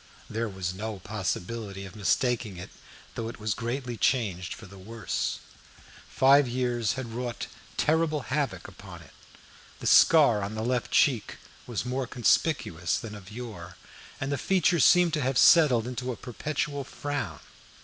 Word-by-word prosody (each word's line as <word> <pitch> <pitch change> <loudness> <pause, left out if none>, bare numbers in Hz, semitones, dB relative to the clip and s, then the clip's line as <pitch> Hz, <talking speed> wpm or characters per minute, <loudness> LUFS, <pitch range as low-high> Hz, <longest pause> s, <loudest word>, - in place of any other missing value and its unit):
There 115 +1 -2
was 95 -2 -4
no 105 +2 -5
possibility 100 +1 -4
of 95 +2 -11
mistaking 110 -1 0
it, 90 - -9 0.4
though 115 -1 -4
it 115 - -8
was 105 -1 -1
greatly 120 +2 -4
changed 95 - 0
for 110 - -12
the 95 0 -13
worse. 110 +3 -3 0.7
Five 135 +1 +5
years 120 -3 0
had 120 -3 -6
wrought 120 -1 -4 0.3
terrible 155 -1 +1
havoc 135 +3 -2
upon - - -12
it. - - -18 0.7
The - - -8
scar 140 -10 +6
on 100 +2 -4
the 110 - -3
left 125 0 -1
cheek 125 -7 +2 0.3
was 120 -1 -3
more 130 +1 -2
conspicuous 115 - +1
than 115 -2 -7
of 100 -3 -11
yore, 105 -7 -8 0.4
and 135 +1 -3
the 145 - -1
features 175 -2 +3
seemed 180 -2 +5
to 155 - 0
have 130 -1 0
settled 135 -9 +6
into 125 +1 -4
a 120 - -6
perpetual 145 +3 -3
frown. 145 +2 -4
120 Hz, 155 wpm, -27 LUFS, 105-135 Hz, 0.7 s, scar